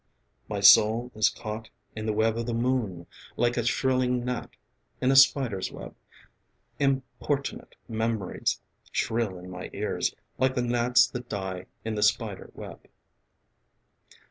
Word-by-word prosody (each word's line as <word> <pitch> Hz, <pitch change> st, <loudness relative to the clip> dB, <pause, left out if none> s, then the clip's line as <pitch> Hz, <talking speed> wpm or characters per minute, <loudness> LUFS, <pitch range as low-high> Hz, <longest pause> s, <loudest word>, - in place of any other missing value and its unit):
My 105 Hz, -2 st, -2 dB
soul 110 Hz, +5 st, +6 dB
is 110 Hz, -, +3 dB
caught 110 Hz, 0 st, -7 dB, 0.3 s
in 110 Hz, 0 st, -4 dB
the -, -, +2 dB
web 110 Hz, +1 st, +2 dB
of 115 Hz, 0 st, -3 dB
the 120 Hz, -, -1 dB
moon, 115 Hz, -8 st, -1 dB, 0.3 s
Like 120 Hz, 0 st, +2 dB
a 120 Hz, -, 0 dB
shrilling 125 Hz, 0 st, +1 dB
gnat 125 Hz, -1 st, -3 dB, 0.5 s
in 130 Hz, -, +2 dB
a -, -, +3 dB
spider's 130 Hz, -7 st, +4 dB
web. -, -, -9 dB, 0.9 s
Importunate 135 Hz, +1 st, -2 dB
memories 110 Hz, -4 st, -1 dB, 0.3 s
shrill 115 Hz, -5 st, -1 dB
in 90 Hz, +1 st, -10 dB
my 90 Hz, 0 st, -7 dB
ears -, -, -1 dB, 0.2 s
Like 130 Hz, +1 st, +2 dB
the 125 Hz, -, +1 dB
gnats 120 Hz, +1 st, +4 dB
that 125 Hz, -1 st, -7 dB
die 95 Hz, -3 st, -4 dB, 0.2 s
in 110 Hz, -, -2 dB
the 105 Hz, -, -2 dB
spider 105 Hz, -1 st, 0 dB
web. -, -, -10 dB
115 Hz, 140 wpm, -27 LUFS, 105-125 Hz, 0.9 s, soul